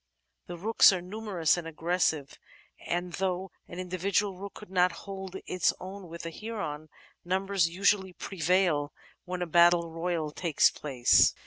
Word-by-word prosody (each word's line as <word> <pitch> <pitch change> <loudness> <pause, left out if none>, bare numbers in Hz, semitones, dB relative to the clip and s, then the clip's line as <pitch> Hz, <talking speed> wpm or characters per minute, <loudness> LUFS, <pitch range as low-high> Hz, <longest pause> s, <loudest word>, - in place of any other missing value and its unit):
The 175 - -6
Rooks 215 +4 +6
are 185 - -1
numerous 185 -3 0
and 170 -2 -5
aggressive, 160 -3 -1 0.5
and 175 0 -2
though 190 -1 -2 0.2
an 175 - -9
indi 185 0 -4
vidual 195 0 0
Rook 200 0 -7
could 210 -3 -12
not 180 -1 +3
hold 190 -2 -7
its 180 - +1
own 190 0 -8
with 170 0 -8
a 165 - -4
Heron, 165 -8 -5 0.3
numbers 190 -1 +1
usually 190 +1 +1
prevail 175 -5 0 0.3
when 180 0 -3
a - - -2
battle 170 0 +4
royal 165 -2 -2
takes 165 -1 +3
place. 130 -5 +3
180 Hz, 150 wpm, -29 LUFS, 165-190 Hz, 0.5 s, Rooks